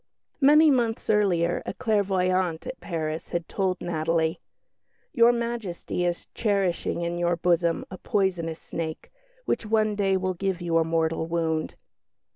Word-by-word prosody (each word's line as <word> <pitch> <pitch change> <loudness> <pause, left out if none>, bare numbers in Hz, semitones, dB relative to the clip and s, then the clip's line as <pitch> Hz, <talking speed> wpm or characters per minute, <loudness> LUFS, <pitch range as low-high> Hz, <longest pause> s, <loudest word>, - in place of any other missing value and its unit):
Many 300 +2 +6
months 235 -4 +1
earlier 180 -5 +2
a - - -5
clairvoyante 185 -6 0
at 260 - -6
Paris 160 -2 -4
had 170 -1 -3
told 190 -2 -1
Natalie, 160 -1 0 0.7
"Your 235 -3 +6
Majesty 230 -7 -3
is 175 0 -2
cherishing 195 -5 0
in 170 0 -2
your 175 0 +2
bosom 170 -1 +1
a 185 - -8
poisonous 180 -5 -1
snake, 160 -2 -6 0.3
which - - 0
one 215 0 +1
day 195 -2 +1
will 185 0 -1
give 190 0 -2
you 170 -2 +1
a - - +3
mortal 160 0 0
wound." 160 -2 -1
180 Hz, 140 wpm, -26 LUFS, 165-210 Hz, 0.7 s, Many